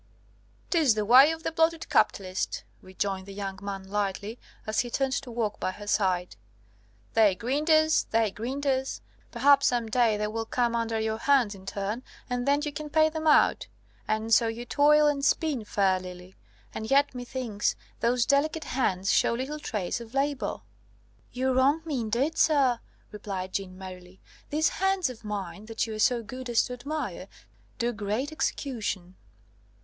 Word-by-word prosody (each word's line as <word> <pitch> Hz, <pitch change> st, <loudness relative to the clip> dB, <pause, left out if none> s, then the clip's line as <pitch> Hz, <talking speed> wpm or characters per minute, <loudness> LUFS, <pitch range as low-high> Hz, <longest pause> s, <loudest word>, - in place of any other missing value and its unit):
"'Tis 310 Hz, -, +4 dB
the 210 Hz, -1 st, -1 dB
way 255 Hz, +6 st, +8 dB
of 325 Hz, 0 st, -6 dB
the -, -, -1 dB
bloated 325 Hz, 0 st, +1 dB
capitalist," 185 Hz, -1 st, 0 dB, 0.2 s
rejoined 190 Hz, 0 st, -4 dB
the 200 Hz, -, -8 dB
young 195 Hz, -1 st, -5 dB
man 200 Hz, -1 st, -5 dB
lightly, 205 Hz, +2 st, -3 dB, 0.3 s
as 215 Hz, 0 st, -1 dB
he 245 Hz, -, 0 dB
turned 270 Hz, +2 st, 0 dB
to 275 Hz, -2 st, -3 dB
walk 230 Hz, -3 st, -2 dB
by -, -, -1 dB
her 205 Hz, +2 st, -8 dB
side. 185 Hz, -, 0 dB, 0.8 s
"They 215 Hz, -4 st, +4 dB
grind 275 Hz, -, -2 dB
us, 315 Hz, 0 st, +5 dB
they 225 Hz, -2 st, +2 dB
grind 255 Hz, +7 st, -5 dB
us; 265 Hz, -1 st, -1 dB, 0.3 s
perhaps 275 Hz, +3 st, +5 dB
some 240 Hz, -2 st, +1 dB
day 230 Hz, -2 st, +3 dB
they 210 Hz, -, -1 dB
will 225 Hz, +1 st, -3 dB
come 240 Hz, -1 st, 0 dB
under 230 Hz, -1 st, -1 dB
your 220 Hz, 0 st, -1 dB
hands 260 Hz, -6 st, +3 dB
in 190 Hz, -1 st, -14 dB
turn, 205 Hz, +4 st, -3 dB, 0.3 s
and 245 Hz, +1 st, -1 dB
then 285 Hz, +1 st, +3 dB
you 295 Hz, -1 st, -3 dB
can 305 Hz, 0 st, -6 dB
pay 315 Hz, +1 st, +4 dB
them 315 Hz, 0 st, -3 dB
out. 300 Hz, -, +4 dB, 0.4 s
And 220 Hz, +1 st, 0 dB
so 230 Hz, -, +5 dB
you 230 Hz, +2 st, -4 dB
toil 300 Hz, +4 st, +4 dB
and 290 Hz, -2 st, +1 dB
spin, 290 Hz, -6 st, +1 dB
fair 195 Hz, -3 st, +2 dB
lily! 180 Hz, 0 st, -10 dB, 0.4 s
And 220 Hz, 0 st, -5 dB
yet, 280 Hz, +1 st, +3 dB
methinks, 245 Hz, -4 st, -2 dB, 0.2 s
those 240 Hz, +1 st, +2 dB
delicate 305 Hz, +3 st, +1 dB
hands 195 Hz, -7 st, +1 dB
show -, -, +3 dB
little 270 Hz, +5 st, -4 dB
trace 210 Hz, -4 st, -3 dB
of 235 Hz, +2 st, -11 dB
labour?" 280 Hz, -, -1 dB, 0.7 s
"You 260 Hz, +1 st, 0 dB
wrong 275 Hz, +5 st, +3 dB
me, 295 Hz, -5 st, -2 dB
indeed, 240 Hz, +8 st, -1 dB
sir," 275 Hz, -6 st, +3 dB, 0.3 s
replied 195 Hz, -3 st, -5 dB
Jeanne 185 Hz, -2 st, -4 dB
merrily. 185 Hz, -1 st, -10 dB, 0.3 s
"These 310 Hz, +2 st, +2 dB
hands 385 Hz, -6 st, 0 dB
of 230 Hz, -2 st, -13 dB
mine, 205 Hz, 0 st, -5 dB
that 225 Hz, -1 st, -1 dB
you 225 Hz, -, -6 dB
are 215 Hz, -, -6 dB
so 235 Hz, +1 st, +2 dB
good 255 Hz, +3 st, -7 dB
as 235 Hz, -, +3 dB
to 250 Hz, -, -5 dB
admire, 295 Hz, +5 st, -5 dB, 0.5 s
do 240 Hz, 0 st, 0 dB
great 215 Hz, +7 st, -2 dB
execution!" 215 Hz, -, -3 dB
235 Hz, 175 wpm, -27 LUFS, 205-280 Hz, 0.8 s, way